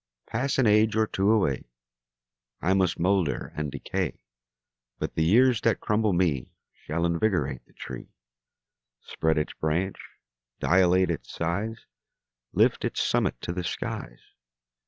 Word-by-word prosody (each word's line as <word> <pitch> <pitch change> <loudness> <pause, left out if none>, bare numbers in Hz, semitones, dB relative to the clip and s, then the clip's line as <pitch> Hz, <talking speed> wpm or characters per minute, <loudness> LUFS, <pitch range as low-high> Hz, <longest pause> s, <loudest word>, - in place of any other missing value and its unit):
Pass 130 +4 -1
an 135 - +4
age 110 0 +4
or 110 0 +3
two 100 -1 0
away, 95 - +2 0.9
I 90 - +2
must 95 -3 +2
moulder 90 -3 0
and 75 -2 -3
decay, 90 -4 -3 0.7
But - - -3
the 80 - +1
years 120 +7 +4
that 115 - +2
crumble 105 0 +1
me 85 -8 +1 0.2
Shall 85 +3 -3
invigorate 85 - 0
the - - -26
tree, - - -8 0.9
Spread 80 0 0
its 75 - -1
branch, 85 +5 -1 0.6
dilate 90 0 +4
its 65 -7 -5
size, 100 +7 -3 0.7
Lift - - +3
its - - -2
summit - - +1
to 85 - -3
the 90 0 -3
skies. - - -5
90 Hz, 135 wpm, -27 LUFS, 80-110 Hz, 0.9 s, an